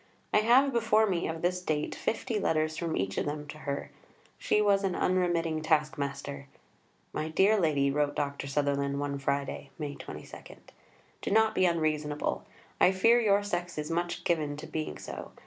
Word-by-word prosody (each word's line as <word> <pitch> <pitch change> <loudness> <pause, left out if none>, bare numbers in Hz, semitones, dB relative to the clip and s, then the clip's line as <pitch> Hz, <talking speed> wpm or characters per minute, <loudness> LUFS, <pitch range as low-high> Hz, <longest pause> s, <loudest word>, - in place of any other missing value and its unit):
I - - +6
have 250 +5 +4
before 220 -2 +3
me, 185 -5 0
of 160 +1 -5
this 180 +1 +1
date, 155 -4 -1
fifty 225 0 -2
letters 155 -4 +1
from 165 -1 -2
each 95 +1 -1
of - - -2
them 150 0 -4
to 155 - -8
her. 140 -2 -4 0.5
She - - +2
was 200 -1 +3
an 190 -2 0
unremitting 170 -3 +1
task 155 -1 +2
master. 140 -1 -5 0.7
"My 155 - -2
dear 200 +6 +4
Lady," 145 -5 +2
wrote 145 0 0
Dr. 140 -1 -2
Sutherland 140 0 0
one 140 -1 -2
Friday 140 0 -2
(May 150 -3 -4
22), 130 -2 -10 0.7
"do - - -3
not 220 +1 +4
be 185 - +3
unreasonable. 155 -3 -1 0.3
I 185 - +6
fear 230 +6 +4
your 205 -2 +3
sex 175 -4 -3
is 150 +1 -3
much 175 +1 -2
given 155 -4 0
to 155 - -7
being 155 -1 -4
so. - - -8
155 Hz, 175 wpm, -29 LUFS, 145-185 Hz, 0.7 s, I